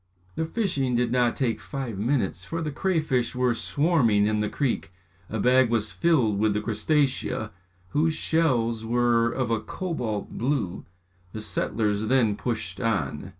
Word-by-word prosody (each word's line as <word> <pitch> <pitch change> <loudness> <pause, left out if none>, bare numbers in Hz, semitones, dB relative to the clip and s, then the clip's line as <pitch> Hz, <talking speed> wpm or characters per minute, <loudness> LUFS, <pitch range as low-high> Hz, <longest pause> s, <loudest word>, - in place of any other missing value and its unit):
The 160 - -2
fishing 160 - -1
did 120 -1 +1
not 125 -1 +2
take 115 -5 -1
five 130 -8 -5
minutes 105 - 0
for 165 - -4
the 150 - -2
crayfish 150 -8 0
were 125 -1 +2
swarming 120 -5 +2
in 105 0 +1
the 105 0 0
creek. 130 - -2 0.4
A 110 - -3
bag 125 +2 +4
was 110 -2 0
filled 130 -12 +2
with 110 0 +2
the - - +1
crustaceæ, 120 0 0 0.4
whose 155 - +1
shells 120 -9 +1
were 120 0 +2
of 125 -2 -2
a 115 - +2
cobalt 115 - -4
blue. 120 -7 -1 0.5
The 110 - -5
settlers 105 0 -1
then 120 -5 +3
pushed 105 -6 -3
on. 95 - -1
120 Hz, 150 wpm, -26 LUFS, 110-135 Hz, 0.5 s, bag